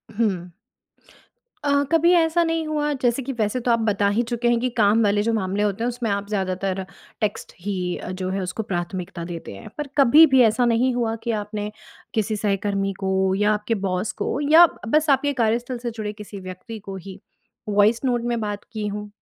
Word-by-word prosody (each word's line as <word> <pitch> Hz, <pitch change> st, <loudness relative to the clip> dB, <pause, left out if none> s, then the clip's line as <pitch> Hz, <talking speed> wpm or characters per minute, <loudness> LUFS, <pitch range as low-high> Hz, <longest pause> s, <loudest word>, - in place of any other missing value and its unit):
हुँ। 190 Hz, -6 st, -1 dB, 1.1 s
अ, 285 Hz, 0 st, +3 dB
कभी 335 Hz, +1 st, +4 dB
ऐसा 335 Hz, 0 st, +3 dB
नहीं 330 Hz, -1 st, -1 dB
हुआ 300 Hz, -1 st, 0 dB
जैसे 245 Hz, +1 st, +1 dB
कि 270 Hz, +2 st, -4 dB
वैसे 220 Hz, 0 st, -1 dB
तो 240 Hz, -, +1 dB
आप 230 Hz, -, +3 dB
बता 210 Hz, -2 st, +1 dB
ही 240 Hz, -, +3 dB
चुके 240 Hz, 0 st, 0 dB
हैं 240 Hz, -1 st, +3 dB
कि 255 Hz, +2 st, 0 dB
काम 215 Hz, +1 st, +4 dB
वाले 205 Hz, 0 st, +2 dB
जो 230 Hz, +1 st, 0 dB
मामले 200 Hz, -1 st, 0 dB
होते 210 Hz, +1 st, -1 dB
हैं 240 Hz, -, +1 dB
उसमें 240 Hz, -2 st, -3 dB
आप 200 Hz, 0 st, -2 dB
ज़्यादातर 190 Hz, -1 st, -2 dB, 0.4 s
टेक्स्ट 210 Hz, -1 st, -2 dB
ही 180 Hz, -2 st, -2 dB
अ, -, -, -6 dB
जो 185 Hz, 0 st, -4 dB
है 195 Hz, +1 st, -2 dB
उसको 185 Hz, +4 st, -3 dB
प्राथमिकता 175 Hz, -1 st, -4 dB
देते 170 Hz, -, -7 dB
हैं। 95 Hz, -, -10 dB
पर 295 Hz, -1 st, -3 dB
कभी 285 Hz, +4 st, +8 dB
भी 260 Hz, -, +7 dB
ऐसा 230 Hz, +3 st, +3 dB
नहीं 240 Hz, +2 st, +2 dB
हुआ 230 Hz, -2 st, 0 dB
कि 235 Hz, -, -1 dB
आपने 210 Hz, 0 st, -5 dB, 0.4 s
किसी 215 Hz, 0 st, 0 dB
सहकर्मी 200 Hz, -1 st, -1 dB
को 190 Hz, -1 st, +1 dB
या 210 Hz, +2 st, +2 dB
आपके 210 Hz, +2 st, -1 dB
बॉस 185 Hz, +3 st, -1 dB
को -, -, -1 dB
या 330 Hz, +3 st, +9 dB
ब-बस 305 Hz, +3 st, 0 dB
आपके 285 Hz, +1 st, +3 dB
कार्यस्थल 235 Hz, +3 st, 0 dB
से 240 Hz, 0 st, -4 dB
जुड़े 215 Hz, -2 st, -5 dB
किसी 210 Hz, -1 st, -9 dB
व्यक्ति 185 Hz, +5 st, -8 dB
को 195 Hz, -1 st, -8 dB
ही 190 Hz, -, -9 dB, 0.5 s
वॉइस 210 Hz, +3 st, +3 dB
नोट 245 Hz, -2 st, +1 dB
में 240 Hz, -1 st, 0 dB
बात 205 Hz, -1 st, -4 dB
की 215 Hz, -1 st, -3 dB
हों? 210 Hz, 0 st, -5 dB
215 Hz, 205 wpm, -23 LUFS, 195-240 Hz, 1.1 s, या